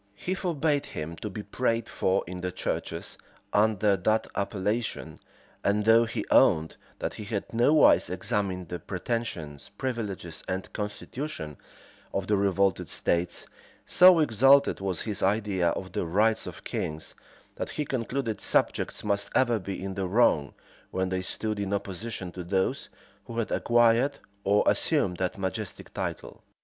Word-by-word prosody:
He 180 Hz, -, -3 dB
forbade 155 Hz, -6 st, 0 dB
him 75 Hz, +2 st, -5 dB
to 105 Hz, -, -5 dB
be 105 Hz, +2 st, -6 dB
prayed 115 Hz, -1 st, -1 dB
for 95 Hz, +1 st, 0 dB
in 90 Hz, +1 st, -6 dB
the 90 Hz, 0 st, -3 dB
churches -, -, -4 dB, 0.3 s
under 105 Hz, -1 st, +3 dB
that 110 Hz, +2 st, +1 dB
appellation; 105 Hz, +3 st, -2 dB, 0.4 s
and 105 Hz, +1 st, +1 dB
though 115 Hz, +1 st, +6 dB
he 115 Hz, -, -4 dB
owned, 80 Hz, 0 st, +4 dB, 0.2 s
that -, -, -3 dB
he -, -, -7 dB
had 100 Hz, +1 st, -4 dB
nowise 140 Hz, +7 st, +5 dB
examined 95 Hz, -4 st, -2 dB
the 90 Hz, -, -4 dB
pretensions, 90 Hz, -, -4 dB
privileges, 105 Hz, -10 st, -4 dB
and 95 Hz, 0 st, -4 dB
constitution 105 Hz, -, -5 dB, 0.6 s
of 95 Hz, -, 0 dB
the 105 Hz, -, +2 dB
revolted 100 Hz, -2 st, +1 dB
states,[*] 85 Hz, 0 st, 0 dB, 0.4 s
so 180 Hz, -1 st, +8 dB
exalted 140 Hz, 0 st, +5 dB
was 95 Hz, -2 st, -2 dB
his 105 Hz, -3 st, -3 dB
idea 95 Hz, -3 st, +1 dB
of 95 Hz, +2 st, -4 dB
the 85 Hz, -, -2 dB
rights 110 Hz, +5 st, +2 dB
of 80 Hz, -3 st, -9 dB
kings, 80 Hz, +1 st, -4 dB, 0.4 s
that -, -, -3 dB
he 150 Hz, -, -3 dB
concluded 125 Hz, -3 st, -2 dB
subjects -, -, 0 dB
must 100 Hz, 0 st, 0 dB
ever 120 Hz, -4 st, +3 dB
be 95 Hz, 0 st, -5 dB
in 95 Hz, +1 st, -4 dB
the 95 Hz, -1 st, -2 dB
wrong, 90 Hz, -8 st, +3 dB, 0.3 s
when 95 Hz, 0 st, -1 dB
they 95 Hz, 0 st, -1 dB
stood 105 Hz, +3 st, -3 dB
in 100 Hz, 0 st, -1 dB
opposition 100 Hz, -1 st, -5 dB
to 90 Hz, 0 st, -7 dB
those 95 Hz, +2 st, -1 dB, 0.4 s
who 115 Hz, -, -7 dB
had 115 Hz, -, -1 dB
acquired 120 Hz, +4 st, +3 dB, 0.3 s
or 100 Hz, +1 st, +3 dB
assumed 90 Hz, -, +2 dB
that 90 Hz, 0 st, -2 dB
majestic 95 Hz, +1 st, -5 dB
title. -, -, -5 dB
100 Hz, 150 wpm, -28 LUFS, 95-115 Hz, 0.6 s, so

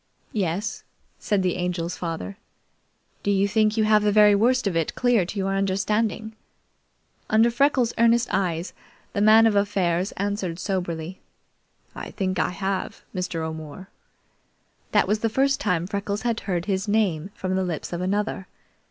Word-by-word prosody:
"Yes," 195 Hz, 0 st, -2 dB, 0.4 s
said 205 Hz, -4 st, 0 dB
the 180 Hz, -, 0 dB
Angel's 175 Hz, -1 st, -2 dB
father. 165 Hz, -, -5 dB, 0.8 s
"Do -, -, -2 dB
you 200 Hz, 0 st, +3 dB
think 215 Hz, +1 st, +2 dB
you 220 Hz, -, +3 dB
have 215 Hz, 0 st, +4 dB
the 210 Hz, 0 st, +2 dB
very 210 Hz, 0 st, +6 dB
worst 245 Hz, +5 st, +2 dB
of 195 Hz, -4 st, 0 dB
it 165 Hz, -2 st, -1 dB
clear 240 Hz, -8 st, +2 dB
to 205 Hz, -, -6 dB
your 195 Hz, 0 st, 0 dB
understanding?" 210 Hz, +3 st, -1 dB, 0.9 s
Under 225 Hz, +2 st, +4 dB
Freckles' 255 Hz, -1 st, +2 dB
earnest 235 Hz, +1 st, +4 dB
eyes 175 Hz, -2 st, -1 dB, 0.4 s
the 200 Hz, -, -1 dB
Man 220 Hz, +2 st, +7 dB
of 220 Hz, -2 st, +3 dB
Affairs 195 Hz, -3 st, +1 dB
answered 200 Hz, -4 st, -2 dB
soberly: 180 Hz, -2 st, -3 dB, 0.7 s
"I -, -, -7 dB
think 185 Hz, -2 st, -2 dB
I -, -, +2 dB
have, 190 Hz, +1 st, -3 dB
Mr. 180 Hz, -3 st, -3 dB
O'More." 160 Hz, +3 st, -7 dB, 1.0 s
That -, -, +3 dB
was 210 Hz, +1 st, +1 dB
the 225 Hz, -, 0 dB
first 275 Hz, +4 st, +2 dB
time 170 Hz, -1 st, 0 dB
Freckles 200 Hz, +2 st, -3 dB
heard 200 Hz, -7 st, -1 dB
his 195 Hz, 0 st, -1 dB
name 195 Hz, -5 st, +1 dB
from 185 Hz, 0 st, -2 dB
the 190 Hz, -, +1 dB
lips 175 Hz, -1 st, -4 dB
of 175 Hz, -, -3 dB
another. 195 Hz, 0 st, -2 dB
200 Hz, 155 wpm, -24 LUFS, 180-215 Hz, 1.0 s, Man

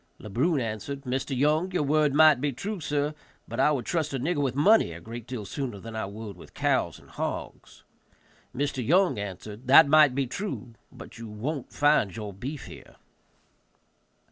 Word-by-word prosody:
Le 105 Hz, -, -10 dB
Brun 145 Hz, -, +1 dB
answered, 120 Hz, +4 st, -4 dB
"Mr. 130 Hz, +1 st, -2 dB
Young, 155 Hz, +7 st, +2 dB
your 180 Hz, -, +1 dB
word 150 Hz, 0 st, +2 dB
might 150 Hz, -2 st, +6 dB
be 145 Hz, -1 st, 0 dB
true, 195 Hz, -, -5 dB
sir, 145 Hz, -1 st, -1 dB, 0.3 s
but -, -, -6 dB
I -, -, +5 dB
would 130 Hz, -6 st, -1 dB
trust 155 Hz, -5 st, -1 dB
a -, -, -2 dB
nigger 150 Hz, +3 st, 0 dB
with 130 Hz, -3 st, -1 dB
money 155 Hz, -, +4 dB
a 85 Hz, -, -9 dB
great 115 Hz, +4 st, -9 dB
deal 125 Hz, -5 st, -5 dB
sooner 120 Hz, +1 st, -4 dB
than 115 Hz, +2 st, -9 dB
I 110 Hz, -, -3 dB
would 105 Hz, -1 st, -8 dB
with -, -, -15 dB
cows -, -, 0 dB
and -, -, -18 dB
hogs." -, -, -6 dB, 0.7 s
Mr. 135 Hz, 0 st, -2 dB
Young 175 Hz, -, +3 dB
answered, 105 Hz, +4 st, -7 dB
"That 140 Hz, +4 st, +8 dB
might 150 Hz, -3 st, +6 dB
be 140 Hz, 0 st, +1 dB
true, 130 Hz, -, -5 dB, 0.2 s
but -, -, -12 dB
you 115 Hz, -, -7 dB
won't 125 Hz, +7 st, -5 dB
find 145 Hz, -10 st, +2 dB
your 105 Hz, -3 st, -6 dB
beef 130 Hz, +8 st, -6 dB
here." -, -, -13 dB
135 Hz, 185 wpm, -27 LUFS, 115-150 Hz, 0.7 s, That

